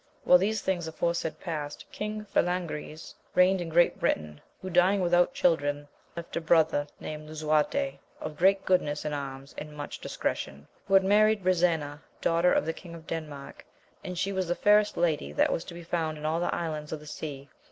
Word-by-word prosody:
While 180 - +7
these 215 +3 0
things 175 -3 -1
aforesaid 170 0 -2
past, 150 -4 -5
King 210 0 -4
Falangriz 175 -5 -2 0.2
reigned 185 +1 +5
in 170 - -4
Great 170 +2 +3
Britain, 75 -1 -1 0.2
who 185 - -6
dying 180 +3 +4
without 175 -1 +3
children, 145 -4 +1 0.3
left 170 -1 -7
a 170 - -1
brother 160 -2 +3
named 155 0 -7
Lisuarte, 155 - 0 0.2
of 150 - -6
great 195 +4 +3
goodness 150 -6 +1
in 150 - -2
arms, 135 -1 -6
and 150 0 -9
much 145 - -6
discretion; 70 +1 -4 0.2
who 195 - +3
had 195 - +7
married 210 +1 +4
Brisena, 165 -5 +1 0.2
daughter 170 +1 +3
of - - +2
the 160 - -1
King 170 0 -11
of 165 -1 -12
Denmark, 150 -4 -6 0.4
and 180 -1 -5
she 195 +2 -1
was 190 -2 -1
the 175 - 0
fairest 210 +1 +4
lady 155 - 0
that - - +3
was - - -2
to 170 - -9
be 170 - -8
found 165 -2 -2
in 150 - -7
all 160 +2 +1
the 175 - 0
islands 155 -3 -4
of 155 - -3
the 150 - -14
sea. 145 -2 -7
165 Hz, 190 wpm, -28 LUFS, 150-180 Hz, 0.4 s, While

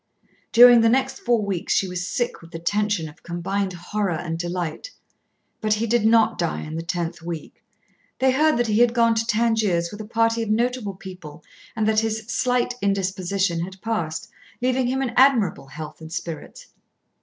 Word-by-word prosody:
During 240 0 +8
the 225 - +4
next 265 +2 +1
four 235 -3 +1
weeks 190 -4 -1
she 195 - +2
was 180 0 -4
sick 240 +4 -2
with 165 - -14
the 165 - -7
tension 205 0 0
of 150 - -14
combined 185 +3 -3
horror 180 +1 -2
and 165 0 -4
delight. 175 - -4 0.7
But 215 -1 +2
he 220 +2 -1
did 230 -1 +2
not 225 -1 +4
die 170 -2 -1
in 155 +1 -6
the 165 - -3
tenth 170 0 -3
week. 165 -2 -7 0.5
They 260 0 +3
heard 305 +2 +3
that 240 - +2
he 215 -1 +1
had 240 0 +4
gone 230 -1 +4
to 225 0 -1
Tangiers 215 -7 +1
with 210 - -7
a - - -7
party 230 +1 +1
of 225 - -3
notable 235 -2 0
people, 180 -5 -11 0.3
and 220 -1 0
that 220 0 +3
his 220 0 -2
"slight" 245 0 +1
indisposition 195 -2 0
had 190 +3 -6
passed, 175 -9 -2 0.3
leaving 255 0 +1
him 265 +2 0
in 250 - -2
admirable 245 - +3
health 155 +3 -9
and 160 0 -10
spirits. 175 - -7
210 Hz, 185 wpm, -23 LUFS, 175-235 Hz, 0.7 s, During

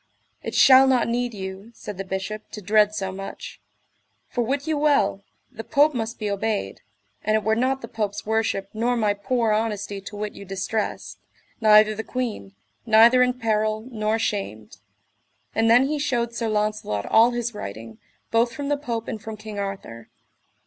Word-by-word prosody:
It - - -5
shall 265 0 +7
not 260 -2 +3
need 245 +1 -1
you, 190 +2 -7
said 205 -2 -8
the - - -2
Bishop, 195 +3 -5
to - - -5
dread 210 +2 +3
so 190 -2 -3
much; 195 +1 -8 0.7
for 245 - -2
wit 275 +4 -1
you 315 -1 0
well, 285 -10 +2 0.3
the 225 - -8
Pope 295 +2 +3
must 230 -1 -3
be 215 - -3
obeyed, 200 - -2 0.4
and 215 +1 +2
it 215 - +1
were 220 - +2
not 260 +3 0
the - - -5
Pope's 210 -3 -3
worship 220 -3 -1
nor 240 +3 0
my 210 -3 +2
poor 225 +2 0
honesty 210 -2 -2
to 200 +2 -9
wit 210 0 -4
you - - -10
distressed, 195 +3 -4 0.4
neither 215 -1 +6
the 220 +1 -5
queen, 230 -6 -4 0.3
neither 230 +2 +6
in 250 0 +3
peril, 215 -1 0
nor 215 -1 0
shamed. 195 - -4 0.8
And 225 0 +2
then 245 +3 +6
he 295 +2 -1
shewed 240 -5 -1
Sir 235 -1 -2
Launcelot 210 - -1
all 225 +2 +5
his 240 -1 -3
writing, 110 - -8 0.3
both 230 +1 +2
from 285 +3 -4
the 290 - +1
Pope 235 -6 -4
and 215 - -5
from 220 0 -7
King 215 -1 -7
Arthur. 195 - -6
220 Hz, 175 wpm, -24 LUFS, 205-240 Hz, 0.8 s, shall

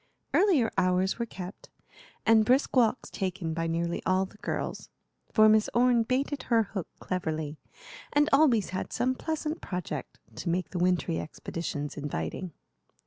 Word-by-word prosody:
Earlier 320 - +4
hours 185 +3 +1
were 235 - -1
kept, 185 -2 -9 0.6
and 225 -1 +6
brisk 255 +7 +2
walks 245 -1 +2
taken 185 -4 -3
by 165 +1 -1
nearly 170 +1 -1
all 185 +1 +2
the 200 - -15
girls; - - -4 0.4
for 215 0 +6
Miss 215 0 +4
Orne 245 -1 +5
baited 260 +4 -1
her 230 -2 +5
hook 195 -3 -5
cleverly, 160 -4 -3 0.5
and 295 +1 +4
always 265 - +4
had 185 - -4
some 255 +2 +1
pleasant 315 +3 -3
project 175 -6 -5 0.2
to 170 - -3
make 180 +1 -1
the 180 - -3
wintry 180 -2 +1
expeditions 150 -2 -5
inviting. 145 - -4
190 Hz, 145 wpm, -29 LUFS, 170-245 Hz, 0.6 s, and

